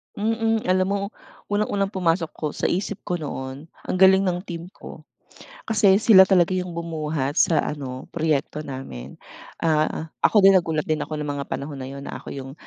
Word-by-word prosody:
Mm. 225 +1 0
Alam 185 0 +3
mo, 200 - 0 0.5
unang-unang 205 -1 0
pumasok 170 -4 0
ko 155 - -4
sa - - -1
isip 195 +2 -2
ko 175 - -2
noon, 140 -1 -6 0.2
ang - - -3
galing 190 +1 +6
ng 180 0 -1
team 170 0 -7
ko. - - -12 0.7
Kasi 205 -3 +4
sila 215 -4 +8
talaga 185 -1 +3
'yong 180 -1 -2
bumuhat 155 -4 -3
sa 165 - +3
ano, 135 -3 -4
proyekto 155 -2 -1
namin, 100 - -8 0.4
ah, 155 -2 +2
ah, 160 - -5 0.2
ako 215 - +4
din 195 - +8
nagulat 160 -4 +1
din 155 -1 0
ako 155 - -5
ng 150 - -3
mga 145 -1 -3
panahon 145 +1 -4
na 130 - -7
'yon 140 0 -8
na - - -6
ako - - -9
'yong 135 -1 -7
165 Hz, 185 wpm, -23 LUFS, 145-190 Hz, 0.7 s, sila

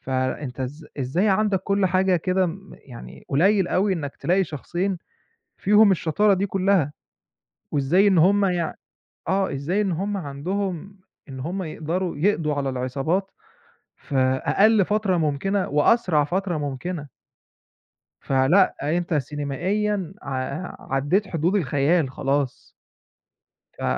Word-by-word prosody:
فأنتَ 130 0 -3
إز 145 +5 -5
إزاي 140 +11 +1
عندك 200 -1 +2
كل 200 0 +1
حاجة 185 0 +2
كده 185 +2 +1
م 195 +3 -8
يعني 120 -3 -11
قليل 190 +6 +3
أوي 195 +2 +1
إنَّك 145 -6 -4
تلاقي 190 +2 +1
شخصين 175 +5 -3 0.6
فيهم 210 +1 +5
الشطارة 195 +4 +2
دي 195 +1 0
كلها، 190 -6 +1 0.8
وإزاي 160 +8 +3
إن 190 -3 +4
هُم 200 +5 +4
يع 175 -4 -1 0.6
آه، 195 0 +1
إزاي 145 +9 -1
إن 200 -3 0
هُم 200 +5 -2
عندهم 185 +5 -4 0.3
إن 130 -1 -8
هُم 180 +8 -3
يقدَروا 165 +2 -3
يقضوا 160 -2 +1
على 140 -1 -2
العصابات 135 +9 -1 0.7
في 140 - -8 0.3
أقَل 215 -1 +4
فترة 205 -3 +1
ممكنة 170 +6 0
وأسرع 150 +1 +3
فترة 180 +2 -2
ممكنة. 145 +3 -4 1.1
فلأ، 135 +9 +3 0.2
أنتَ 175 -1 -2
سينمائيًا 160 +7 -2
ع 135 +4 -5
عدِّيت 180 +10 +1
حدود 170 +3 0
الخيال، 145 -2 +1
خلاص. 135 -1 -2 1.1
ف - - -6
175 Hz, 125 wpm, -23 LUFS, 145-195 Hz, 1.1 s, فيهم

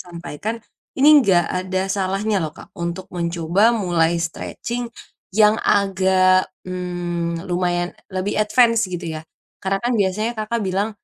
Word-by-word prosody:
sampaikan. 175 +5 -6 0.4
Ini 295 0 +7
enggak 175 -5 +3
ada 185 +1 -2
salahnya 195 0 0
loh 155 - -3
Kak, 155 - -15
untuk 170 +2 -4
mencoba 170 +5 +2
mulai 175 -6 +1
stretching 235 +8 -4 0.4
yang 210 +2 +5
agak, 190 -1 +3 0.2
mmm, 175 -1 -3
lumayan 175 0 -1 0.2
lebih 190 +2 -2
advance 230 +2 +3
gitu 175 -1 -5
ya. - - -10 0.4
Karena 195 +1 0
kan 240 +3 -1
biasanya 215 +2 0
Kakak 220 +2 -2
bilang, 195 0 -1
185 Hz, 130 wpm, -21 LUFS, 175-210 Hz, 0.4 s, Ini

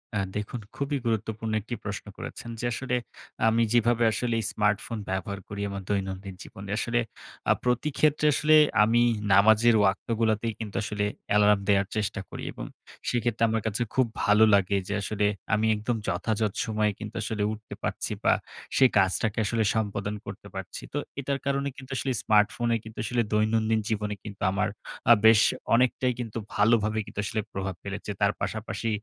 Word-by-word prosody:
আ - - +1 0.2
দেখুন 105 +4 -3 0.2
খুবই 140 +1 -1
গুরুত্বপূর্ণ 110 0 -2
একটি 115 +4 -5
প্রশ্ন - - -5
করেছেন। 120 - -7
যে 120 - -3
আসলে 125 +1 -2 0.5
আমি 115 +1 +3
যেভাবে 120 0 +3
আসলে 120 +1 -1 0.2
স্মার্টফোন 105 +2 0
ব্যবহার 95 +1 -3
করি 100 0 -6
আমার 100 0 -5
দৈনন্দিন 95 -1 -3
জীবনে 100 +1 -10
আসলে 120 +1 0 0.5
আ - - +7
প্রতিক্ষেত্রে, 150 +4 +1
আসলে 155 +2 +4 0.3
আমি 115 +2 +3 0.3
নামাজের 110 +4 +6
ওয়াক্ত 100 -1 +1
গুলাতেই 110 0 +1
কিন্তু 105 -3 -6
আসলে 105 0 -1 0.2
অ্যালার্ম 105 0 +5
দেয়ার 100 -1 +3
চেষ্টা 105 -2 -1
করি। - - -7
এবং - - -7 0.4
সেক্ষেত্রে 120 -2 0
আমার 110 0 0
কাছে 110 +2 -2
খুব 130 -2 +4 0.2
ভালো 105 +1 +5
লাগে 100 0 +3
যে - - -2
আসলে 105 +1 -1 0.3
আমি 110 +1 +2
একদম 110 +3 -2
যথাযথ 105 +3 0
সময়ে 110 -1 +1
কিন্তু 110 +1 -7
আসলে 110 -2 -2
উঠতে 110 0 -8
পারছি - - -2
বা, - - +5 0.4
সেই 130 -1 +6
কাজটাকে 100 +3 +2
আসলে 110 +1 +1
সম্পাদন 105 -1 -1
করতে 100 +1 -9
পারছি। 95 0 -6
তো - - -1 0.2
এটার 140 0 -2
কারণে 140 0 0
কিন্তু 130 0 -11
আসলে 135 - -1
স্মার্টফোনে 115 +3 +3
কিন্তু 110 0 -12
আসলে 120 +1 +1
দৈনন্দিন 110 +1 +2
জীবনে 105 -1 -1
কিন্তু 105 -2 -9
আমার 105 +2 0 0.4
আ - - +12
বেশ 110 -1 +8 0.3
অনেকটাই 125 +1 +2
কিন্তু 115 -2 -5 0.2
ভালোভাবে 110 0 +3
কিন্তু - - -8
আসলে 110 +2 -1
প্রভাব 95 -1 -3
ফেলেছে। 100 +1 -5
তার 100 0 +4
পাশাপাশি 110 +1 -3
110 Hz, 165 wpm, -27 LUFS, 100-115 Hz, 0.5 s, আ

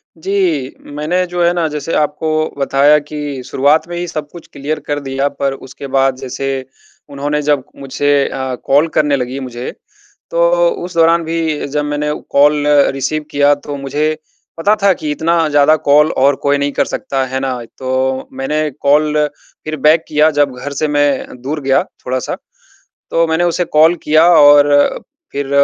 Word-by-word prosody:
जी। 165 -6 -1 0.2
मैंने 155 +5 -1
जो 175 0 -1
है 170 - +4
ना, 170 -2 0
जैसे 150 +1 -4
आपको 150 +1 -1 0.3
बताया 140 +2 +4
कि 145 -2 -6
शुरुआत 145 +5 +2
में 175 - -6
ही 175 0 -3
सब 155 -3 -5
कुछ 170 -2 -12
क्लियर 145 +3 -3
कर 145 0 -1
दिया, 135 0 -2
पर 135 -1 -2
उसके 135 +1 -10
बाद, 135 0 +1
जैसे 135 0 -4 0.4
उन्होंने 145 +1 -2
जब 145 -3 +1 0.2
मुझसे 140 +1 -2 0.2
अ, 130 -1 -4
कॉल 145 +4 +3
करने 150 -2 +2
लगी 130 +1 -3
मुझे, 125 -1 -6 0.6
तो - - +3 0.2
उस 180 - -9
दौरान 165 0 +4
भी 160 -2 -2
जब 150 +1 -2
मैंने 150 0 -2 0.2
कॉल 145 +1 +3 0.3
रिसीव 150 +3 -2
किया, 145 0 +4
तो 145 0 -7
मुझे 150 +3 -2 0.4
पता 205 +6 +2
था 200 - +5
कि 150 -3 -4
इतना 165 +1 +1
ज़्यादा 145 +1 +4
कॉल 150 +2 +5
और 140 +1 +4
कोई 145 0 +2
नहीं 140 0 -1
कर - - +1
सकता, 135 -1 -3
है 130 +1 -3
ना? 130 -2 -3 0.2
तो 130 0 -2
मैंने 150 +3 -1
कॉल 150 +1 +2 0.4
फिर 155 - -3
बैक 160 +1 +4
किया, 155 +1 +3
जब 145 -3 +1
घर 145 +1 -6
से 155 +2 -1
मैं 145 -3 0
दूर 150 +3 -4
गया 135 0 +2 0.2
थोड़ा-सा। 130 -1 -2 0.8
तो 165 0 +2
मैंने 160 +2 0
उसे 175 +1 0
कॉल 160 +2 +4
किया 155 +2 +4
और 145 -1 +5 0.3
फिर 140 -1 -3
145 Hz, 170 wpm, -15 LUFS, 135-155 Hz, 0.8 s, था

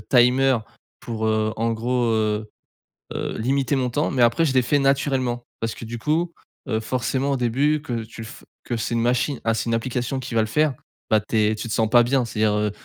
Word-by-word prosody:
timer 130 +1 +5 0.4
pour, 110 -2 -3
heu, 110 0 +1
en 115 +1 0
gros, 120 +2 0
heu 110 -1 0 0.7
heu, - - -3
limiter 135 +3 +1
mon 130 -2 0
temps 145 +6 0
mais 125 - 0
après 120 +8 +3
je 135 - 0
l'ai 130 - +5
fait 145 +4 +2
naturellement. 135 -3 +1 0.2
Parce 115 0 -2
que - - -9
du 120 +1 -5
coup, 165 +7 0 0.4
heu, 110 - +1
forcément 130 +4 -1
au 135 - +1
début 140 +5 +1
que 120 -6 -3
tu 115 0 -10
le 110 - -7
f - - -12 0.2
que 120 - -3
c'est 115 - -2
une 115 - +1
machine 125 +2 0
ah 115 0 +2
c'est 115 - -2
une 115 - -1
application 125 +2 -1
qui 120 -2 -6
va 115 - +4
le 110 - 0
faire, 150 +4 +2 0.4
bah 110 -1 +4
tu 110 +1 -2
es 110 0 +3
tu 110 +2 -5
te - - -2
sens 110 -1 +1
pas 120 0 +6
bien, 125 +1 +1
c'est-à-dire, 110 -2 +1
heu, 105 -1 0
120 Hz, 235 wpm, -23 LUFS, 110-135 Hz, 0.7 s, pas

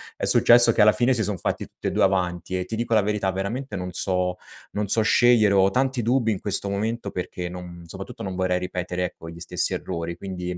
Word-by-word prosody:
è - - -3
successo 120 0 +6
che - - +1
alla 105 0 +6
fine 125 +2 +2
si 120 - 0
son 105 -3 -1
fatti - - -3
tutti - - -8
e - - -1
2 - - +1
avanti 90 -1 -1
e, 90 - -2
ti 110 +5 -6
dico 115 0 -2
la 110 - +4
verità, 105 -1 -1
veramente 100 +6 -4
non 90 -1 -5
so 90 0 -1 0.3
non 105 0 -3
so 110 - +5
scegliere, 110 -1 +4
ho 95 0 +4
tanti 130 +2 0
dubbi 120 0 +1
in 100 - -3
questo 100 0 +1
momento 105 +1 -3
perché 90 -1 -5
non 90 -1 -9
soprattutto - - -9
non 95 -1 -5
vorrei 90 0 0
ripetere, 90 0 -4
ecco, 85 -2 -7
gli 85 0 -11
stessi - - -1
errori. 85 -1 -4
Quindi, 90 -1 -6
95 Hz, 225 wpm, -23 LUFS, 90-110 Hz, 0.3 s, successo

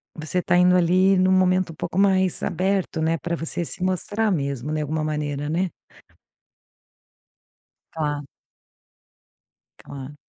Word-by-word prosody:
você 155 +3 -2
tá 175 - +2
indo, 180 0 +5
ali, 185 +2 +4
num 185 0 +3
momento 185 -1 +3
um - - -12
pouco 180 - -3
mais 190 -2 +2
aberto, 190 -3 -1
né, 165 +1 +1
pra 170 +1 -3
você 165 +1 -3
se 180 - -6
mostrar 205 +4 0
mesmo, 140 -3 -2
né, 155 0 -1
alguma 155 +1 -2
maneira 150 -1 -2
né? 180 +3 0 2.2
Tá. 150 -2 -2 1.6
Claro. 140 +1 -9
170 Hz, 130 wpm, -23 LUFS, 150-185 Hz, 2.2 s, indo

